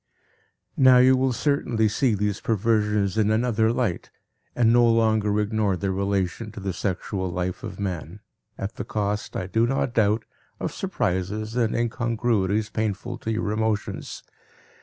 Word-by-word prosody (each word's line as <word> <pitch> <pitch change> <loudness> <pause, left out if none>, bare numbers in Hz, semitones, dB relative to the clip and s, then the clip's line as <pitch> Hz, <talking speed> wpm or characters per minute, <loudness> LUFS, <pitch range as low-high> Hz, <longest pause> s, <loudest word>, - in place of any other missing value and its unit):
Now 130 -2 +7
you 130 +1 +6
will 130 0 +1
certainly 120 -4 +1
see 110 +2 +1
these 105 0 -1
perversions 105 -2 +1
in 105 -1 +3
another 110 0 +2
light 115 -8 -2 0.5
and 115 -1 +4
no 120 0 +5
longer 110 -2 +2
ignore 105 -2 0
their 95 +2 -1
relation 100 +2 -1
to - - -8
the 95 -1 -3
sexual 95 0 -3
life 90 +1 -3
of - - -7
man, 90 -1 -4 0.4
at 100 +2 -5
the - - -3
cost, 105 0 -3
I 90 - -2
do 110 +5 +1
not 130 -1 -1
doubt, 110 0 +2 0.3
of - - -3
surprises 105 +5 -2
and 115 -3 +1
incongruities 115 -3 0
painful 110 +3 -3
to 110 - -3
your 110 -1 -1
emotions. 110 -1 -2
110 Hz, 150 wpm, -24 LUFS, 100-115 Hz, 0.5 s, Now